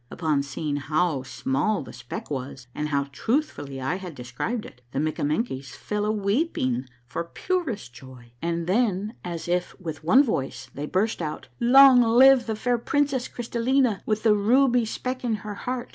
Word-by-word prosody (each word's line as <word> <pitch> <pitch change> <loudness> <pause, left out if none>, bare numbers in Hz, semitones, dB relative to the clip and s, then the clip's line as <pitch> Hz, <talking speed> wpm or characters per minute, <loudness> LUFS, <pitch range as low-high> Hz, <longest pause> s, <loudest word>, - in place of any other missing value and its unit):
Upon 155 -4 0
seeing 145 +1 -3
how 155 +1 0
small 135 +9 -1
the - - -11
speck 120 +4 -8
was 130 -1 -5
and 150 0 -3
how 140 -1 +1
truthfully 220 - -2
I 135 +7 -1
had 180 -5 -8
described 125 - -4
it, 125 - -13
the - - -5
Mikkamenkies 145 - -1
fell 210 0 -3
a 210 - +1
weeping 200 - 0 0.2
for 130 - -4
purest 230 - -3
joy, 125 -2 -13
and 170 0 -1
then, 205 +1 +1
as 170 -2 -5
if 180 +2 -1
with 160 -4 -6
one 255 - +6
voice, 140 - -3
they 145 +2 -5
burst 200 +3 0
out, 155 -2 -5
— - - -36
" - - -36 0.2
Long 265 -3 +9
live 245 +2 +6
the 220 - -1
fair 245 +2 0
princess 275 0 0
Crystallina 240 -1 0
with 215 0 0
the 220 -2 +5
ruby 245 +3 +3
speck 255 +3 -4
in 235 -3 +1
her 210 - -4
heart 250 +3 -4
190 Hz, 175 wpm, -25 LUFS, 145-240 Hz, 0.2 s, Long